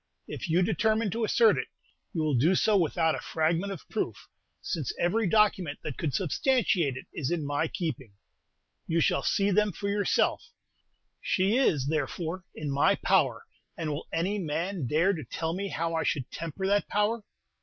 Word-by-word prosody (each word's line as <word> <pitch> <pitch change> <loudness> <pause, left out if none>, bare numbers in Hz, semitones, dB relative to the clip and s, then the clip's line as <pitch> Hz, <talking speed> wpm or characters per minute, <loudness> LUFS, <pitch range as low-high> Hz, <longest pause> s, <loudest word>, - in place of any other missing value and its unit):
If - - -6
you 175 +3 +3
determine 220 +2 +1
to 230 +4 -2
assert 220 - +4
it, - - -3 0.4
you 160 - -1
will 155 -1 +1
do 150 +10 +3
so 215 +3 +3
without 165 -3 +2
a - - -3
fragment 165 +5 0
of 190 - -8
proof, - - -4 0.3
since 155 -7 -3
every 200 +5 +1
document 190 -6 +2
that 145 - -4
could 150 -5 -1
substantiate 185 - +1
it - - -8
is 140 -5 -2
in 170 -4 -1
my 145 +2 0
keeping. 135 - -4 0.7
You 165 0 +1
shall - - +2
see 200 0 +1
them 210 +2 +3
for 200 +3 -4
yourself. 205 0 +1 0.8
She 190 +4 +1
is, 160 - +2
therefore, 165 +4 -2
in 150 -2 -4
my 140 +1 +3
power; - - +1 0.3
and 160 -2 -2
will 145 - -5
any 185 +6 0
man 170 -1 -2
dare 165 +9 +3
to 160 -5 -5
tell 160 +6 -3
me 200 +3 -3
how 165 -3 -2
I 165 - 0
should 135 -6 -1
temper 165 +3 -5
that 200 +1 +2
power?" 210 +2 0
170 Hz, 175 wpm, -28 LUFS, 155-200 Hz, 0.8 s, assert